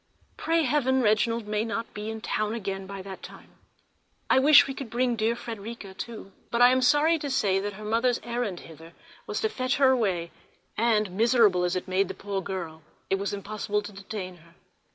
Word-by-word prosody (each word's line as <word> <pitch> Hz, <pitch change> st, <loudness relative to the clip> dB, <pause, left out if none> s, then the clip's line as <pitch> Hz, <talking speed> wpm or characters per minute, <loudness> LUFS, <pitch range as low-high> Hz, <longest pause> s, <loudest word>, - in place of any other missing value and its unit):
Pray 330 Hz, 0 st, +1 dB
heaven, 260 Hz, -2 st, +2 dB
Reginald 225 Hz, +1 st, +2 dB
may 210 Hz, 0 st, -1 dB
not 230 Hz, 0 st, -4 dB
be 210 Hz, +1 st, -5 dB
in 220 Hz, 0 st, -6 dB
town 215 Hz, +1 st, -1 dB
again 195 Hz, -3 st, -4 dB
by 195 Hz, -1 st, -7 dB
that 190 Hz, -1 st, -9 dB
time! -, -, -12 dB, 0.8 s
I -, -, +6 dB
wish 290 Hz, +2 st, +8 dB
we 270 Hz, -, -4 dB
could 265 Hz, -3 st, -7 dB
bring 245 Hz, +1 st, +1 dB
dear 225 Hz, +1 st, +1 dB
Frederica 225 Hz, -3 st, -7 dB
too, 220 Hz, -1 st, -8 dB, 0.2 s
but 235 Hz, -, -1 dB
I 245 Hz, +1 st, +8 dB
am 260 Hz, 0 st, +2 dB
sorry 300 Hz, +5 st, +4 dB
to 290 Hz, -, -4 dB
say 205 Hz, -8 st, +2 dB
that 205 Hz, +1 st, -4 dB
her 210 Hz, +2 st, -9 dB
mother's 235 Hz, +3 st, +1 dB
errand 235 Hz, -6 st, -3 dB
hither 165 Hz, +1 st, -13 dB, 0.3 s
was -, -, -3 dB
to 440 Hz, -, +2 dB
fetch 255 Hz, -7 st, -1 dB
her 270 Hz, -2 st, +5 dB
away; 190 Hz, -9 st, 0 dB, 0.4 s
and, 215 Hz, -3 st, +2 dB
miserable 215 Hz, -3 st, +4 dB
as 180 Hz, +1 st, -1 dB
it 185 Hz, -, -3 dB
made 185 Hz, +1 st, +1 dB
the -, -, -6 dB
poor 195 Hz, -1 st, -4 dB
girl, 170 Hz, -5 st, -6 dB, 0.3 s
it 195 Hz, -, +2 dB
was 200 Hz, +1 st, -2 dB
impossible 210 Hz, +1 st, -3 dB
to 205 Hz, -, -8 dB
detain 195 Hz, -2 st, -7 dB
her. 170 Hz, 0 st, -21 dB
215 Hz, 200 wpm, -27 LUFS, 195-245 Hz, 0.8 s, wish